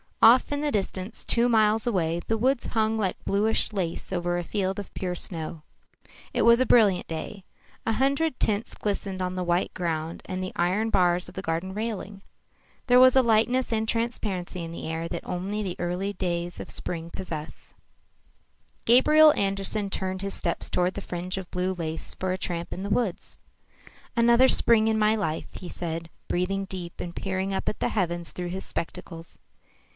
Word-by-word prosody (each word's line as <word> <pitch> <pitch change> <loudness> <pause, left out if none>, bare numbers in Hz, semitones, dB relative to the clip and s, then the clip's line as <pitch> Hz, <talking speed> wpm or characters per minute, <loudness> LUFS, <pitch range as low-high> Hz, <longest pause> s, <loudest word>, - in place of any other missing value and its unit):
Off 240 +5 +7
in 290 0 -1
the 295 -1 0
distance, 195 -1 -3
two 235 +1 +3
miles 220 -1 +3
away, 170 -6 0
the 225 - +1
woods 255 +3 +1
hung 220 -1 +1
like 195 -4 -2
bluish 215 +2 +1
lace 180 -4 -3
over 175 -1 0
a 175 - -2
field 190 +1 -2
of 200 - -8
pure 180 -1 -3
snow. 165 -4 -2 0.7
It - - +1
was 235 +1 +6
a 255 - +4
brilliant 205 -7 +4
day. 165 +4 -6 0.4
A 225 - +3
hundred 275 +4 +1
tints 210 +1 0
glistened 195 -2 -3
on 180 0 -1
the 185 - -1
white 175 +1 0
ground 165 -2 -3
and 185 -1 -4
the 185 - -4
iron 195 +6 +1
bars 180 -2 +2
of - - -14
the 190 - -3
garden 170 +2 -2
railing. 210 -2 -4 0.7
There 250 0 +7
was 255 0 +7
a 265 - +6
lightness 235 +3 +2
and 220 0 0
transparency 205 -7 -2
in 165 - -6
the 170 - -6
air 160 +1 -3
that 170 - -5
only 190 +4 -2
the 185 -3 -3 0.4
days 175 -2 -2
of - - -6
early - - -10
spring 165 -1 -4
possess. 160 -4 -7 1.1
Gabriel 305 +6 +7
Andersen 195 +1 -1
turned 190 0 -2
his 195 - -2
steps 170 - -2
toward 180 +1 0
the 200 - -4
fringe 180 0 -4
of 190 -2 -6
blue 180 +1 -1
lace 165 -3 -3
for 185 0 -2
a 185 - -1
tramp 170 -2 -4
in 190 - -6
the 200 - -4
woods. 210 -4 -1 0.8
"Another 235 +2 +6
spring 225 -3 +4
in 220 0 +2
my 215 +1 +4
life," 160 -7 -2
he 180 - -8
said, 165 -1 -4 0.2
breathing 195 +2 -1
deep 180 -3 -7
and 175 -1 -6
peering 190 0 -2
up - - -1
at - - -5
the - - +1
heavens 175 -4 -1
through 180 -1 -5
his 190 +2 -4
spectacles. 165 0 -6
190 Hz, 185 wpm, -26 LUFS, 175-220 Hz, 1.1 s, Off